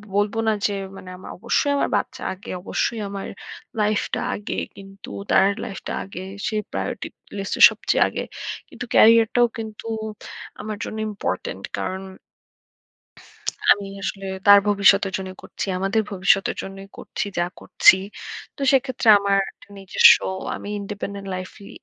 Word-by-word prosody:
বলবো 205 +2 +1
না 220 - +4
যে 205 - -3 0.2
মানে 185 - -10
আমার - - -10
অবশ্যই 235 +7 +1
আমার - - +1
বাচ্চা - - -4
আগে। 195 +5 -10
অবশ্যই 225 +2 -1
আমার 195 -1 -5 0.5
লাইফটা 210 0 0
আগে। 205 - -5 0.2
কিন্তু 195 0 -12 0.2
তার 195 - +6 0.2
লাইফটা 195 - -6
আগে। 185 -1 -8 0.2
সে 215 - -2 0.2
প্রায়োরিটির - - -4 0.3
লিস্টের 195 - +1
সবচেয়ে - - +1
আগে। - - -4 0.5
কিন্তু - - -7
ক্যারিয়ারটাও 230 +2 +6
কিন্তু 220 0 -7 0.7
আমার 215 0 -5
জন্য 220 - -5
ইম্পরটেন্ট। 205 - -4 0.2
কারণ 190 0 -3 1.7
আমি 200 -1 +4 0.2
আসলে 195 -1 -4 0.2
তার 205 0 +10
ভবিষ্যতের 200 -1 +4
জন্যই 190 -1 -7
করছি। - - -5
আমাদের 195 +4 +1
ভবিষ্যতের 195 +1 +2
জন্যই 195 0 -9
করছি, - - -4
যা 175 - +2
করছি। - - +6 0.6
তো - - -15
সেক্ষেত্রে 260 -3 +1
আমার 200 0 +2 0.4
নিজস্ব 195 -1 +7 0.4
আমি - - -8
independent 200 0 -6
লাইফই 185 +2 -8
200 Hz, 130 wpm, -23 LUFS, 195-215 Hz, 1.7 s, তার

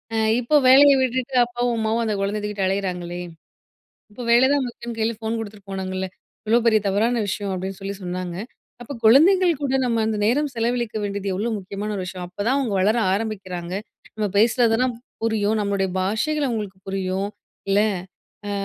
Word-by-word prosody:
அ - - +1 0.2
இப்போ 250 +5 +1
வேலயை 280 +1 +8
விட்டுட்டு, 260 +1 -1
அப்பாவும், 240 0 -1
அம்மாவும் 220 +1 0
அந்த 215 - 0
குழந்தைய 205 +2 -1
தூக்கிட்டு 210 -2 -2
அலையிறாங்களே! 180 -2 -2 0.9
இப்போ 245 - -8
வேல 245 +3 +6
தான் 285 -2 +2
முக்கியம்ன்னு 235 -1 -8
கையில 225 +1 +1
ஃபோன் 225 +1 -2
குடுத்துட்டு 205 -2 -8
போனாங்கல்ல, 190 0 -3 0.4
இவ்ளோ 230 +2 +4
பெரிய 220 -2 +5
தவறான 225 +4 +1
விஷயம் 200 0 -2
அப்பிடின்னு 190 0 -5
சொல்லி 200 +1 -4
சொன்னாங்க. 180 -1 -4 0.5
அப்போ 245 - -8
குழந்தைங்கள் 345 - +6
கூட 270 -1 0
நம்ம 230 -2 +1
அந்த 215 -1 -1
நேரம் 285 +6 +2
செலவழிக்க 235 -1 -1
வேண்டியது 200 -1 -3
எவ்ளோ 215 +5 -1
முக்கியமான 200 +2 -5
ஒரு 190 - -3
விஷயம். 185 -1 -6
அப்ப 180 - -29
தான் 265 +3 +3
அவங்க 235 -7 -1
வளர 215 +5 +3 0.2
ஆரம்பிக்கிறாங்க. 190 -5 -4 0.4
நம்ம 215 -1 0
பேசுறதெல்லாம் 235 +2 +3 0.3
புரியும். 220 -1 +1
நம்மளுடைய 200 -1 0
பாஷைகள் 270 +10 0
அவுங்களுக்கு 205 -5 -4
புரியும். 195 +1 -2 0.4
இல்ல, 200 - +4 0.7
அ - - -3
215 Hz, 165 wpm, -23 LUFS, 195-240 Hz, 0.9 s, வேலயை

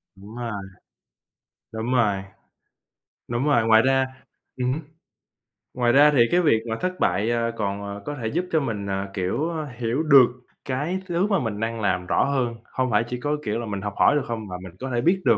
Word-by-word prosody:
Đúng 100 +4 -12
rồi, 120 -2 -4 1.2
đúng 110 +3 -3
rồi, 105 -6 +2 1.1
đúng 120 +4 -1
rồi, 120 -6 +3
ngoài 110 0 +7
ra 135 +1 +3 0.5
ừm 125 0 0
hứm, 160 - -4 0.9
ngoài 120 -1 +2
ra 145 +4 +6
thì 135 -5 +4
cái 180 - +4
việc 115 -9 +3
mà 110 - -1
thất 185 0 -2
bại, 95 +6 +1
ờ, 115 0 0
còn, 100 -1 -2
à, - - -8
có 145 - -4
thể 110 - -2
giúp 175 +10 -1
cho 160 - +3
mình, 105 -7 -3
à, 95 0 -2
kiểu, 105 - -1 0.3
hiểu 120 +6 -1
được 140 -4 +8 0.4
cái 150 +8 -2
thứ 175 +3 +1
mà 200 -3 +2
mình 110 -4 -3
đang 115 0 -2
làm 90 -2 0
rõ - - +2
hơn, 130 -4 0 0.2
hông 130 -1 0
phải 105 +1 +3
chỉ 125 0 -4
có, 145 +3 -1
kiểu, 110 +2 -1
là 120 - -4
mình 100 -2 -4
học 105 0 -4
hỏi - - +5
được 145 - +1
không? 110 -2 -4
Mà 90 - -6
mình 90 -2 -10
có 130 - -4
thể 120 - +1
biết 185 +6 +2
được, 110 - +5
120 Hz, 215 wpm, -24 LUFS, 105-140 Hz, 1.2 s, được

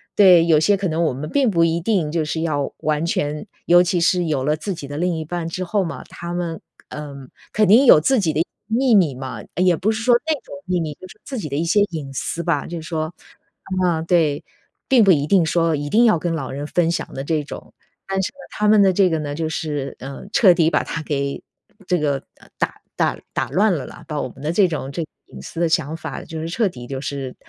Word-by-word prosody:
对 180 -5 +7
有 160 -3 +5
些 205 +6 +3
可 195 -1 -2
能 160 +1 -1
我 160 - +1
们 145 +4 -6
并 270 - +2
不 170 -3 +3
一 165 0 +2
定 180 -6 0
就 160 -1 0
是 160 +1 -2
要 145 -4 -1
完 155 +2 0
全 150 +1 -2 0.2
尤 175 +1 +6
其 175 0 0
是 175 +1 +2
有 150 -5 -1
了 150 +2 +1
自 195 +5 -4
己 145 -5 -8
的 145 - -6
另 175 +1 0
一 160 - -3
半 170 +1 -4
之 185 +3 -4
后 195 +2 0
嘛， 165 - -6
他 170 0 -7
们， 170 -2 -3 0.3
呃 150 -2 -7 0.4
肯 215 - +3
定 230 +8 +6
有 155 - +8
自 265 - +3
己 165 -6 0
的 155 - +1 0.3
秘 235 +2 +3
密 175 -8 +4
嘛。 130 0 -6
呃 - - -2
也 180 -2 +4
不 195 +7 0
是 220 0 -3
说 240 +1 +4
那 320 - +2
种 - - -11
秘 180 -1 0
密， 155 -3 -3
就 185 - -12
是 - - -16
自 265 -3 -6
己 180 - -4
的 140 - -4
一 155 - 0
些 200 +5 +3
隐 150 -5 -5
私 165 +5 -3
吧。 145 -3 0
就 170 -1 -6
是 160 - -10
说， 155 0 -3 0.7
嗯 165 -2 +1
对， 160 -3 +2 0.4
并 255 -4 +5
不 195 - +6
一 145 -4 +2
定 180 -1 +4
说 165 0 +1
一 145 0 -4
定 235 +9 +4
要 215 -7 +4
跟 170 +1 -2
老 155 -5 -3
人 140 +2 -5
分 165 +2 +1
享 170 - -4
的 135 - -4
这 150 0 -1
种。 - - -10 0.4
但 195 0 -1
是 - - -1
呢， 280 - -25
他 210 - -1
们 210 -1 +6
的 195 - +5
这 190 +1 +3
个 160 - 0
呢， 145 -1 -4
就 160 +1 -2
是， 150 -4 -3
呃 135 +1 -8
彻 195 -5 +6
底 165 -1 +3
把 - - +2
它 160 - -5
给 140 -2 -3 0.4
这 180 -2 +2
个 140 -3 -1 0.3
打 - - -2
打 - - 0
打 - - -1
乱 210 +3 +3
了 140 - -4
啦， 175 - -12
把 150 -2 -3
我 - - -3
们 130 - -15
的 150 +2 -1
这 190 +2 +4
种 150 -5 -4
这 165 +4 -3
个 155 - -11 0.2
隐 65 - -12
私 165 - -8
的 170 -1 +2
想 160 -2 0
法， 165 - -6
就 160 -1 -6
是 165 - -4
彻 220 +4 +1
底 120 -7 -10
就 135 -1 -4
是 135 -3 -5
165 Hz, 275 characters per minute, -21 LUFS, 150-185 Hz, 0.7 s, 有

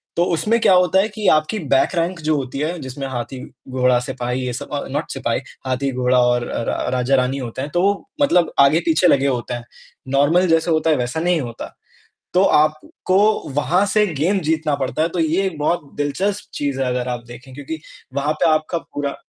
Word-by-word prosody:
तो 170 - +3
उसमें 210 +9 +1
क्या 190 - +5
होता 180 +1 +4
है 200 - +2
कि 210 -1 -3
आपकी 155 +7 +2 0.2
बैक 135 - +4
रैंक 170 +1 -1
जो 155 -1 0
होती 135 -1 -4
है, 160 +4 -2
जिसमें 135 0 -6
हाथी-घोड़ा-सिपाही 125 0 -2
ये 125 - -3
सब 125 - -7
अ, 145 - -2
नॉट 145 +4 -3
सिपाही, 125 -2 -2 0.3
हाथी-गोड़ा 130 -1 +1
और 120 0 +1
रा - - -3
रा - - -2
राजा-रानी 130 +1 +1
होते 125 -1 -5
हैं, 140 - -4
तो 175 - +2
वो 200 +1 +4 0.3
मतलब 180 - +3
आगे-पीछे 160 +4 +4
लगे 140 -3 +3
होते 125 -2 -2
हैं, 120 -1 -5 0.5
नॉर्मल 170 +6 +4
जैसे 165 0 +2
होता 160 0 +2
है 155 - +4
वैसा 125 +4 -2
नहीं 175 -1 +1
होता, 120 -3 -7 0.6
तो 185 - +4
आपको 155 +3 +2 0.3
वहाँ 175 +7 +2
से 215 -1 +4
गेम 175 +8 +1
जीतना 155 -2 +1
पड़ता 135 +2 -2
है, 165 - +2
तो 175 - -4
ये 165 +4 +1
एक 185 -5 -3
बहुत 150 -1 -1
दिलचस्प 190 +8 -2
चीज़ 140 -2 -2
है 130 - 0
अगर 125 0 -1
आप 120 -1 -4
देखें 125 +2 -12
क्योंकि 145 +4 -6 0.3
वहाँ 145 +2 0
पे - - +5
आपका 155 +2 0
पूरा 145 -3 -5
145 Hz, 195 wpm, -20 LUFS, 130-170 Hz, 0.6 s, क्या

